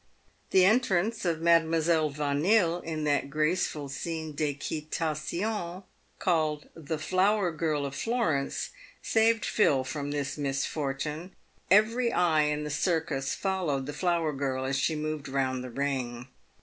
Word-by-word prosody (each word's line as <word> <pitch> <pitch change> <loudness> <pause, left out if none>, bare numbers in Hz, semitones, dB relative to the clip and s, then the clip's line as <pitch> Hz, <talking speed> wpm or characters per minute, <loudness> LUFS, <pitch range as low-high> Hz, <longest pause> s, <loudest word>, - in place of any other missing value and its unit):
The 185 -1 +5
entrance 215 -1 +2
of 165 -2 0
Madlle. 165 -2 +3
Yanille, 165 +5 +2
in 160 -1 -3
that 145 -2 +1
graceful 155 0 0
scene 160 +3 -4
d'equitation 160 +6 -3 0.3
called 155 -4 0
the 160 -1 -4
" - - -8
Mower 190 0 +3
Girl 155 -2 -1
of 140 - -5
Florence," 160 - -1 0.3
saved 225 0 +3
Phil 140 -11 +3
from 140 +2 -4
this 145 0 -3
misfortune. 145 +4 -3 0.3
Every 230 +5 +4
eye 160 -6 +3
in 150 0 -1
the 150 - -4
circus 150 -4 0
followed 175 -9 -1
the 145 - -5
flower 170 -1 0
girl 135 -1 -2
as 135 +1 -1
she 155 +4 +1
moved 155 -2 -4
round 130 -1 -1
the 130 - -6
ring. 130 -2 -3
155 Hz, 135 wpm, -28 LUFS, 140-175 Hz, 0.3 s, The